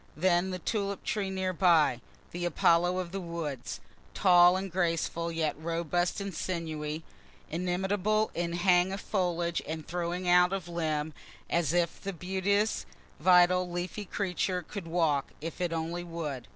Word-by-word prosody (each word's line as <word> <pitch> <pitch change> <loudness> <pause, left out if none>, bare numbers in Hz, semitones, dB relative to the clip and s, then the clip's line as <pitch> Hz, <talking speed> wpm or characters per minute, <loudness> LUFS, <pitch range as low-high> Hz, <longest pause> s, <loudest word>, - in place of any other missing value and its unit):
Then 175 +2 +2
the 185 - -3
tulip 200 +1 -2
tree 200 -3 -1
near 190 -1 -1
by 165 -9 +4 0.3
the 175 0 -4
Apollo 175 +1 +3
of 180 -2 -3
the 195 - -3
woods 165 -7 -5 0.4
tall 175 0 +6
and 190 0 -4
graceful, 170 -1 0
yet 165 -2 -1
robust 170 +3 -1
and 200 -1 -4
sinewy, 160 -3 -3 0.5
inimitable 190 +5 0
in 170 0 -2
hang 180 +1 +3
of 195 - -3
foliage 175 -4 -1
and 160 0 -5
throwing 175 +1 -3
out 180 +1 +5
of 190 -3 -3
limb; 160 -3 -2 0.4
as 170 -4 +2
if 170 -1 0
the 195 0 -4
beauteous, 190 - 0 0.3
vital, 180 +1 +5
leafy 175 +4 -4
creature 180 -1 -1
could 200 -5 -6
walk, 160 -5 +1
if 165 +3 -6
it 175 -2 0
only 165 +2 -3
would. 155 -7 -5
175 Hz, 150 wpm, -30 LUFS, 165-185 Hz, 0.5 s, tall